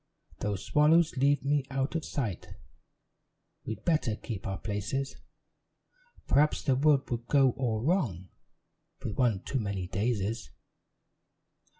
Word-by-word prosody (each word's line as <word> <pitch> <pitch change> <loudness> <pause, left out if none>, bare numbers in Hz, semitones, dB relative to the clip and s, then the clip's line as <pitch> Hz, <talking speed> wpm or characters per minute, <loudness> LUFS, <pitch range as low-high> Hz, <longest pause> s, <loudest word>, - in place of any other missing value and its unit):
"Though 105 -1 -1
swallows 155 - +3
leave 140 +2 +2
me 145 0 +2
out 135 0 -1
of 165 -2 -2
sight, 115 - -4 1.1
We'd 110 -1 -5
better 150 -10 +2
keep 105 -3 -6
our 95 0 -2
places; 105 +7 -3 1.1
Perhaps 150 +2 +3
the 135 -3 +2
world 140 0 +3
would 120 0 -3
go 135 -3 +5
all 115 -4 -2
wrong, 120 - 0 0.7
With 105 - -3
one 115 -7 +2
too 135 - -2
many 100 -4 -2
daisies. 105 +1 -2
125 Hz, 120 wpm, -30 LUFS, 105-140 Hz, 1.1 s, go